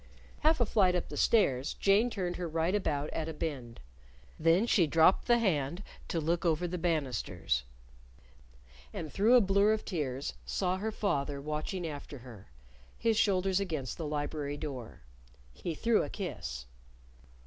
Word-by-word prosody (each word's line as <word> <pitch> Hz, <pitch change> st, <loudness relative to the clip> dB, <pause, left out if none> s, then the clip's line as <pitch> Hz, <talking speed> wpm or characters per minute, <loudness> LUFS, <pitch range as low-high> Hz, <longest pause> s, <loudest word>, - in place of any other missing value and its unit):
Half 315 Hz, 0 st, +3 dB
a 240 Hz, -, +3 dB
flight 190 Hz, -4 st, +3 dB
up 180 Hz, -, -2 dB
the -, -, -6 dB
stairs, 140 Hz, -, +2 dB
Jane 205 Hz, +5 st, +3 dB
turned 180 Hz, -6 st, -3 dB
her 180 Hz, -, -3 dB
right 165 Hz, +3 st, 0 dB
about 150 Hz, -8 st, -1 dB
at 160 Hz, 0 st, -3 dB
a 160 Hz, -, -6 dB
bend. 135 Hz, -7 st, -5 dB, 0.6 s
Then 165 Hz, +6 st, +4 dB
she 185 Hz, -8 st, +3 dB
dropped 165 Hz, +5 st, +4 dB
the 240 Hz, -1 st, +5 dB
hand 175 Hz, -, 0 dB, 0.2 s
to 165 Hz, -, -1 dB
look 165 Hz, +3 st, 0 dB
over 170 Hz, 0 st, +1 dB
the 180 Hz, +1 st, -4 dB
banisters. 120 Hz, -, -1 dB, 1.3 s
And 155 Hz, -, -6 dB
through 220 Hz, +5 st, +5 dB
a 245 Hz, -, +8 dB
blur 200 Hz, +2 st, +4 dB
of 220 Hz, -, -3 dB
tears 140 Hz, -6 st, -3 dB
saw 185 Hz, -1 st, -1 dB
her 220 Hz, +3 st, -2 dB
father 145 Hz, -10 st, -1 dB
watching 155 Hz, +5 st, -3 dB
after 145 Hz, -2 st, -6 dB
her, 110 Hz, -6 st, -12 dB, 0.5 s
his 225 Hz, -1 st, +1 dB
shoulders 195 Hz, -3 st, +2 dB
against 155 Hz, -10 st, -3 dB
the 160 Hz, -, -3 dB
library 145 Hz, -1 st, -3 dB
door. 135 Hz, -6 st, -7 dB, 0.5 s
He 165 Hz, -, -5 dB
threw 230 Hz, +6 st, +2 dB
a -, -, -3 dB
kiss. 65 Hz, -, -5 dB
165 Hz, 160 wpm, -31 LUFS, 145-195 Hz, 1.3 s, a